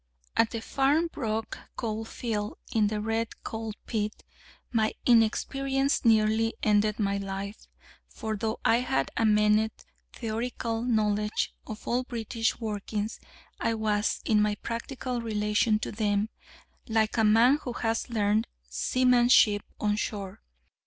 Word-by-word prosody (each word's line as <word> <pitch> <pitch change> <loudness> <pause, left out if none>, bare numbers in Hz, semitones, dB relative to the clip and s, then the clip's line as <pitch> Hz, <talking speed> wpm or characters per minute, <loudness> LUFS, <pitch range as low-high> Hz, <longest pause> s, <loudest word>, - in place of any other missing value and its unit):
At 225 - +4
the 230 - -4
Farnbrook 270 -5 0 0.2
Coal 225 -1 -3
field, 215 -3 -3 0.2
in 215 -2 +3
the 210 0 -2
Red 225 +1 -2
Colt 220 -1 -5
Pit, 215 -2 -3 0.5
my 220 -2 +1
inexperience 270 +4 +2
nearly 225 0 +3
ended 210 0 +3
my 200 -2 0
life: 195 +1 -5 0.4
for 220 -1 -4
though 220 +1 -2
I 230 - +5
had 135 - 0
a 225 - +2
minute 210 +1 +2 0.3
theoretical 230 0 -3
knowledge 210 -3 0
of 215 -1 -8
all 245 +2 +2
British 230 -2 -2
workings, 210 -1 -3 0.4
I 230 - 0
was, 215 -1 0
in 215 -2 +3
my 210 0 +2
practical 240 +3 -4
relation 215 0 +1
to 215 - -4
them, 210 0 0 0.6
like 220 -1 +2
a 220 - +4
man 230 +7 +5
who 245 - -4
has 225 +1 -1
learnt 215 -1 +1 0.2
seamanship 240 - +4 0.2
on 210 -1 +1
shore. 200 -3 -4
220 Hz, 130 wpm, -28 LUFS, 210-230 Hz, 0.6 s, I